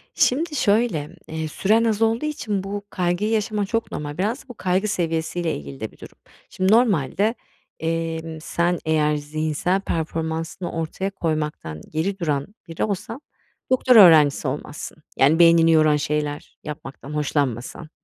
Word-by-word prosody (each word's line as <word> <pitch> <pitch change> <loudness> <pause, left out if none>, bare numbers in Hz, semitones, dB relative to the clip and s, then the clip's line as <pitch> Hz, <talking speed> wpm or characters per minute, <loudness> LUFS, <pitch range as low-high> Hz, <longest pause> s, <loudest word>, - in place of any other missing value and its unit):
Şimdi 300 +4 +2
şöyle, 200 - +1
eee, 160 0 -4
süren 215 +8 +2
az 225 -1 0
olduğu 225 +5 +2
için 215 -10 -2
bu 200 +1 -5
kaygıyı 180 +4 0
yaşaman 210 -1 0
çok 230 +3 -2
normal. 145 +1 -5
Biraz 220 +8 -1
da - - -35
bu - - -7
kaygı 190 +1 0
seviyesiyle 165 -2 -1
ilgili 70 -2 -9
de - - -5
bir - - -21
durum. - - -13 0.3
Şimdi 185 +2 0
normalde, 215 - +2 0.4
emm, 165 -1 -3
sen 170 +1 0
eğer 150 -1 +2
zihinsel 155 +5 -1
performansını 165 +1 -3
ortaya 165 +4 -3
koymaktan 150 - -3
geri 190 +6 -2
duran 145 -5 -1 0.2
biri 165 - -3
olsan, 220 +6 -3 0.5
doktora 250 -3 +7
öğrencisi 150 -5 +6
olmazsın. 150 +3 -6
Yani 150 +5 +4
beynini 165 -1 +6
yoran 155 -1 +5
şeyler 150 0 -3
yapmaktan 150 -1 -8
hoşlanmasan. 145 0 -2
165 Hz, 145 wpm, -23 LUFS, 150-200 Hz, 0.5 s, doktora